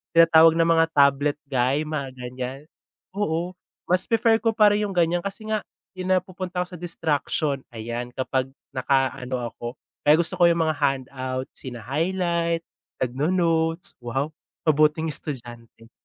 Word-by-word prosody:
tinatawag 165 0 +7
ng 165 - +4
mga 165 -1 +5
tablet 140 +1 +3
guy 135 +3 +1
mga 145 -3 -3
ganiyan, 125 +2 -5 0.5
oo, 180 -3 -1 0.3
mas 180 +1 +2
prefer 225 0 +3
ko 225 - +2
pa 210 -2 +5
rin 210 - +1
'yung 195 -3 -3
ganiyan, 175 0 +2
kasi 200 +2 -6
nga 215 -1 0 0.3
'yung 185 0 -3
napupunta 185 -1 -1
ako 180 0 -11
sa 170 - -10
distraction 155 -4 -1
ayan 120 +2 -4
kapag 130 0 -1 0.2
naka-ano 130 -1 0
ako 120 - -7 0.4
kaya 150 +1 +7
gusto 170 - -4
ko 175 - +5
'yung 170 0 +2
mga 155 - +1
handout, 130 -2 -1
sina 125 -3 -8
highlight, 170 - 0 0.4
nagno-notes, 165 +6 0
wow, 135 +6 -2 0.3
mabuting 155 +1 +3
estudyante. 120 -5 -7
155 Hz, 140 wpm, -24 LUFS, 130-175 Hz, 0.5 s, tinatawag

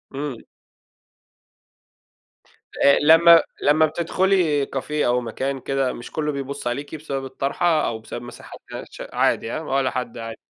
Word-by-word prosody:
إمم. 140 -4 -4 2.5
آآ، 140 - +6
لمّا 165 +2 +7 0.2
لمّا 155 +2 +4
بتدخلي 170 -2 +1
café 135 +2 -6
أو 125 -5 +1
مكان 130 +4 -3
كده، 135 -1 -1
مش 120 - -9
كله 150 -1 -1
بيبُص 140 -1 -5
عليكِ 140 +5 -4
بسبب 140 -3 -5
الطرحة 150 +5 0
أو 110 -1 -3
بسبب 115 +2 -8
مساحة 120 - -11
ده - - -6
ش - - -8
عادي، 115 - +1
هاه، 155 - -4
ولا 135 -3 0
حد، 125 -2 -4
عادي. 115 -1 -7
140 Hz, 145 wpm, -22 LUFS, 125-155 Hz, 2.5 s, لمّا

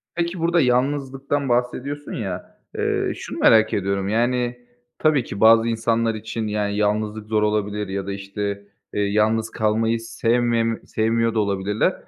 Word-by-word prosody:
Peki, 170 +1 -2
burada 170 +1 +3
yalnızlıktan 135 +2 0
bahsediyorsun 125 +4 -2
ya, 95 -6 -5 0.2
eee, - - 0
şunu - - -7
merak 110 -1 +5
ediyorum, 100 0 -1
yani, 120 +2 0 0.4
tabii 155 -4 +3
ki 100 - -7
bazı 115 +1 +6
insanlar 115 0 0
için, 110 +1 -4
yani, 105 -1 -1
yalnızlık 105 0 -1
zor 110 -1 +1
olabilir 105 -1 -1
ya 95 0 -3
da, - - -2
işte, 100 +1 -4 0.3
eee, 105 - 0
yalnız 110 +2 +1
kalmayı 110 +1 0
sevmemi 115 0 0
sevmiyor 115 +1 +1
da 110 - +1
olabilirler. 100 0 0
110 Hz, 145 wpm, -22 LUFS, 105-120 Hz, 0.4 s, bazı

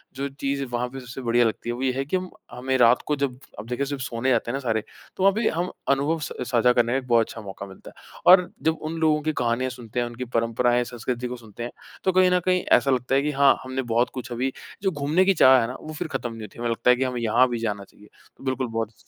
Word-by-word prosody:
जो 140 +1 -2
चीज़ 140 0 -3
वहाँ 120 +1 0
पे 135 +2 -8
सबसे 130 +1 -8
बढ़िया 120 0 +3
लगती 115 +1 -2
है, - - 0
वो 125 - -7
ये 130 - +2
है 135 +1 -2
कि 165 +7 0
हम 185 0 -5 0.2
हमें 130 +2 -1
रात 120 0 +5
को 150 - +1
जब 135 -3 -2 0.2
अब 110 - -8
देखिए 125 +3 -2
जब 140 0 -4
सोने 125 0 -2
जाते 120 -2 +1
हैं - - -6
ना - - -2
सारे, 115 -5 -1 0.3
तो 190 - +1
अभी 205 +4 +2
हम 175 +3 -2 0.2
अनुभव 145 +4 +1
स - - -5 0.2
साझा 125 0 +4
करने 120 -1 +2
का - - +2
एक 130 -1 -5
बहुत 115 -2 +4
अच्छा 115 - -8
मौका 100 -1 -8
मिलता 95 -1 -13
है। - - -17
और 180 -1 +6
जब 160 0 +2
उन 155 +1 -4
लोगों 155 -1 +3
की 155 +1 -1
कहानियाँ 120 +2 0
सुनते 120 -2 -6
हैं, 120 - 0
उनकी 120 +2 -6
परंपराएँ, 120 +1 +2
संस्कृति 120 +1 -4
को 125 - -5
सुनते 115 0 -10
हैं, 120 - -5 0.3
तो 190 - +3
कहीं 185 0 +4
ना 180 - +4
कहीं 185 -1 +2 0.2
ऐसा 135 - 0
लगता 125 +1 +1
है 135 - +4
कि 150 +1 -1
हाँ, 140 -1 +5
हमने 130 0 -3
बहुत 120 +2 +3
कुछ 130 0 -7
अभी 130 +2 -1 0.3
जो 190 - +2
घूमने 150 +4 +1
की 195 - +4
चाह 130 -7 +7
है 115 - -1
ना, 125 - -6
वो 155 - -8
फिर 150 - -4
खत्म 125 -3 -4
नहीं 115 - -9
होती। 110 +1 -10
हमें 120 0 -1
लगता 115 +1 +1
है 125 - +7
कि 130 - -1
हमें 125 -2 -2
यहाँ 115 +3 +4
भी 120 -1 -2
जाना 105 -3 -2
चाहिए। 105 +1 -19 0.3
बिल्कुल 130 -1 -2
बहुत 115 -1 -3
125 Hz, 275 wpm, -24 LUFS, 120-140 Hz, 0.3 s, चाह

